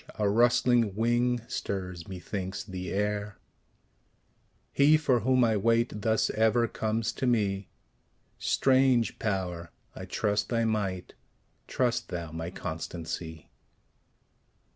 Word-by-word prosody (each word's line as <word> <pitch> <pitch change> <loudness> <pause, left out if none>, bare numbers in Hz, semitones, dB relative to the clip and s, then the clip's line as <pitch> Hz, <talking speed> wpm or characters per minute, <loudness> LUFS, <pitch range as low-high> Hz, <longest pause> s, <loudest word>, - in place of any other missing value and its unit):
a 105 - +1
rustling 120 0 +3
wing 120 +2 +1
stirs, 90 -3 -4
methinks, 95 +1 -5
the 90 -3 -6
air: 105 0 -2 1.3
He 150 +3 +5
for 135 -5 +2
whom 130 +3 +3
I 115 -2 +3
wait, 115 +1 +1
thus 110 +1 +1
ever 110 +2 +2
comes 110 0 -1
to 130 - -2
me; 100 -5 0 0.7
Strange 130 -3 +2
Power! 90 -5 -2 0.3
I - - -7
trust 105 -1 -1
thy 115 -1 +1
might; 100 -5 -2 0.5
trust 125 -2 0
thou 85 -3 -5
my 80 +1 -5
constancy. 80 -1 -6
105 Hz, 110 wpm, -28 LUFS, 95-120 Hz, 1.3 s, He